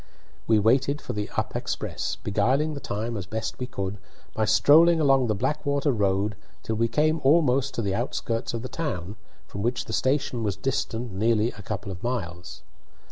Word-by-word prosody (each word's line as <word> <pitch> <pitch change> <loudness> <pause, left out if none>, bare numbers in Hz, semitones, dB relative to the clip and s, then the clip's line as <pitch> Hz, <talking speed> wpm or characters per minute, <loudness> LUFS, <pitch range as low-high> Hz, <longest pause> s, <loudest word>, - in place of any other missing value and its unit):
We 110 - +5
waited 130 +7 +3
for - - -6
the 105 0 -3
up - - -1
express, - - -3
beguiling 130 +10 +1
the 140 - -5
time 115 0 -3
as 95 -4 -5
best 110 +2 -4
we 125 - -3
could 100 -5 -4 0.3
by 110 - +1
strolling 160 +10 +6
along 135 -4 +4
the 105 - +1
Blackwater 145 +5 0
road 100 -2 +1 0.3
till 110 - -2
we 115 +1 +2
came 155 +5 +1
almost 140 -2 +3
to 115 - -1
the 100 -2 0
outskirts 115 +4 -2
of 115 - -4
the - - -3
town, 105 - -4 0.3
from 100 - -7
which 120 +2 -1
the 110 - -6
station 130 -2 0
was 105 -3 -1
distant 120 -3 -2
nearly 110 +3 +2
a 105 - -11
couple 100 -1 -5
of 90 -1 -8
miles. 90 -8 -4
115 Hz, 185 wpm, -26 LUFS, 105-135 Hz, 0.3 s, strolling